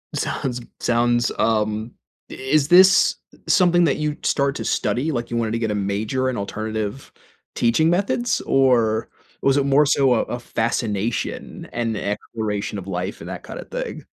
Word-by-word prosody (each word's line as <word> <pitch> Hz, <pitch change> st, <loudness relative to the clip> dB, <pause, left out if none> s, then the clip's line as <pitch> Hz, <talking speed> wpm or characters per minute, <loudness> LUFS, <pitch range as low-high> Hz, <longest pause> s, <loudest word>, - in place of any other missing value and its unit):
Sounds 125 Hz, -2 st, -2 dB, 0.2 s
sounds, 120 Hz, 0 st, +2 dB
um 110 Hz, 0 st, 0 dB, 0.4 s
i -, -, -7 dB
is 140 Hz, +2 st, +1 dB
this 185 Hz, +2 st, +6 dB, 0.3 s
something 175 Hz, -2 st, +4 dB
that 145 Hz, -, +1 dB
you'd 150 Hz, -1 st, -3 dB
start 140 Hz, -1 st, +1 dB
to -, -, -5 dB
study? 145 Hz, +6 st, 0 dB
Like, 120 Hz, -3 st, -3 dB
you 120 Hz, -, -1 dB
wanted 115 Hz, -2 st, -1 dB
to 115 Hz, -, -1 dB
get 110 Hz, -2 st, -1 dB
a -, -, -1 dB
major 105 Hz, +6 st, -1 dB
in 125 Hz, -, -3 dB
alternative 110 Hz, +4 st, -4 dB, 0.4 s
teaching 120 Hz, +8 st, +3 dB
methods, 200 Hz, +7 st, +1 dB
or, 120 Hz, -5 st, +2 dB, 0.3 s
was 135 Hz, 0 st, +3 dB
it 140 Hz, -, +2 dB
more 140 Hz, +2 st, +4 dB
so 135 Hz, -3 st, +3 dB
a 115 Hz, -, +2 dB
a 120 Hz, -, -5 dB
fascination, 115 Hz, -2 st, -2 dB
and 115 Hz, -2 st, -1 dB
exploration 105 Hz, 0 st, -3 dB
of 95 Hz, -1 st, -7 dB
life 90 Hz, 0 st, -4 dB
and -, -, -8 dB
that -, -, -7 dB
kind -, -, -8 dB
of -, -, -10 dB
thing? -, -, -5 dB
120 Hz, 170 wpm, -22 LUFS, 110-140 Hz, 0.4 s, this